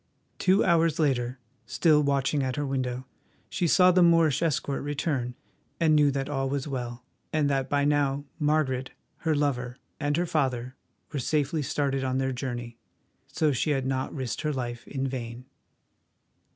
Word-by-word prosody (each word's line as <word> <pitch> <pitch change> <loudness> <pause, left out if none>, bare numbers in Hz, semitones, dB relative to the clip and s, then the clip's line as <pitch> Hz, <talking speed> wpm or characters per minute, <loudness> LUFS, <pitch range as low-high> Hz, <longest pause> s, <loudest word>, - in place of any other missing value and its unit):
Two 190 +2 +4
hours 165 -3 +3
later, 130 -5 0 0.3
still 150 +4 +4
watching 140 0 +1
at 130 -1 -1
her 145 0 -1
window, 130 -2 -2 0.5
she 175 - 0
saw 180 +2 +6
the 180 0 +4
Moorish 165 -4 +4
escort 145 -4 0
return, 140 -4 -2 0.4
and 160 -2 +4
knew 150 -1 +5
that 135 -1 -2
all 135 -2 -1
was 140 +1 -2
well, 125 -3 -5 0.3
and 155 -2 +2
that 135 -1 0
by 145 -1 +2
now, 145 -1 +1
Margaret, 145 -4 +1 0.3
her 160 -1 0
lover, 130 -4 -1 0.2
and 145 0 0
her 175 - +1
father 130 -6 -1 0.4
were 145 - -1
safely 150 +3 0
started 140 -1 -1
on 130 0 0
their 135 0 0
journey. 120 -2 -5 0.5
So 150 +2 +1
she 135 +3 0
had 135 -3 +1
not 130 0 -1
risked 130 -5 -4
her 155 - 0
life 120 -3 -4
in 135 -1 -3
vain. 125 -1 -6
140 Hz, 165 wpm, -27 LUFS, 130-150 Hz, 0.5 s, saw